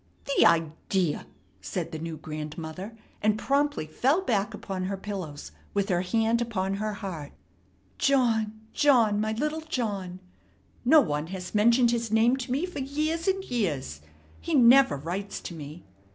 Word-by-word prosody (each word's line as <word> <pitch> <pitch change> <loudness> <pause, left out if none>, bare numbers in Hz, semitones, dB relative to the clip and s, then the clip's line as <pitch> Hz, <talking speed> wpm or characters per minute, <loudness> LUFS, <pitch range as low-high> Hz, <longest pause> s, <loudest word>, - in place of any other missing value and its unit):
"The - - +7
idea!" 165 +1 0 0.3
said - - -4
the 160 - -5
new 165 0 -5
grandmother, 160 +7 -7 0.2
and 215 0 +2
promptly 285 - 0
fell 265 - +1
back 210 - 0
upon 185 -1 -4
her 195 +1 -3
pillows 190 -8 -6 0.2
with 200 0 +1
her 175 -2 +2
hand 225 +5 +1
upon 195 -5 -1
her 215 +1 -2
heart. 175 -8 -6 0.7
"John, 225 -5 +2
John, 235 -8 +4
my 215 0 0
little 300 +7 -2
John. 205 - -3 0.6
No 300 +5 +7
one 150 - -2
has 185 0 -7
mentioned 235 +3 +4
his 230 -2 -1
name 225 +3 +4
to 250 -2 -5
me 280 +7 +1
for 360 -5 -7
years 305 +5 -2
and 385 0 +1
years. 155 - -2 0.4
He 335 - -2
never 265 - +6
writes 185 +8 -4
to - - -7
me." 155 +1 -9
215 Hz, 150 wpm, -27 LUFS, 180-255 Hz, 0.7 s, The